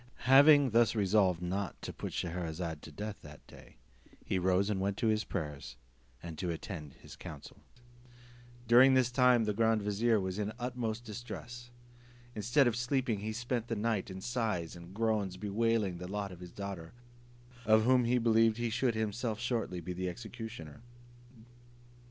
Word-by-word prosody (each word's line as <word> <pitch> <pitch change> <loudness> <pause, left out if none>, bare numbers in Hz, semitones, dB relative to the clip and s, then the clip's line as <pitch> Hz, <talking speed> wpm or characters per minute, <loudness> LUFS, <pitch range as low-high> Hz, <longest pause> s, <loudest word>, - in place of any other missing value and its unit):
Having 140 +1 +7
thus 115 +1 +4
resolved 95 -4 +2
not 95 +2 -3
to - - -5
put - - -6
Scheherazade 85 -2 -4
to 80 - -11
death 105 +6 -6
that 75 -1 -13
day, - - -16 0.5
he 95 - 0
rose 95 +2 +2
and 100 -3 -1
went 100 +1 -1
to 115 - +1
his 110 -1 +1
prayers, 75 -10 -5 0.5
and 80 -2 -7
to 90 - -2
attend 80 -3 -6
his - - -13
council. - - -10 1.1
During 130 +3 +7
this 130 -2 +3
time 125 -2 +4
the 105 -1 0
grand 110 0 +2
vizier 105 +2 +2
was 95 +1 -3
in 105 - -1
the 110 - -6
utmost 120 -2 -3
distress. 120 +1 -8 0.6
Instead 120 +6 +2
of 120 -2 +2
sleeping, 125 -2 0
he 110 +2 -4
spent 120 +1 -3
the 115 - -2
night 110 -2 -1
in 95 0 -7
sighs 110 -9 -2
and 85 0 -11
groans, 105 -3 -1
bewailing 105 -2 0
the 90 - -6
lot 100 0 -4
of 90 - -11
his 90 -1 -10
daughter, 95 -5 -7 0.7
of 110 0 +4
whom 125 0 +4
he 125 +2 +2
believed 115 -1 +3
he 120 -1 -1
should 120 0 +1
himself 110 +1 -2
shortly 115 -7 -2
be 90 +2 -5
the 90 +1 -3
executioner. 110 -7 -8
110 Hz, 170 wpm, -32 LUFS, 95-120 Hz, 1.1 s, Having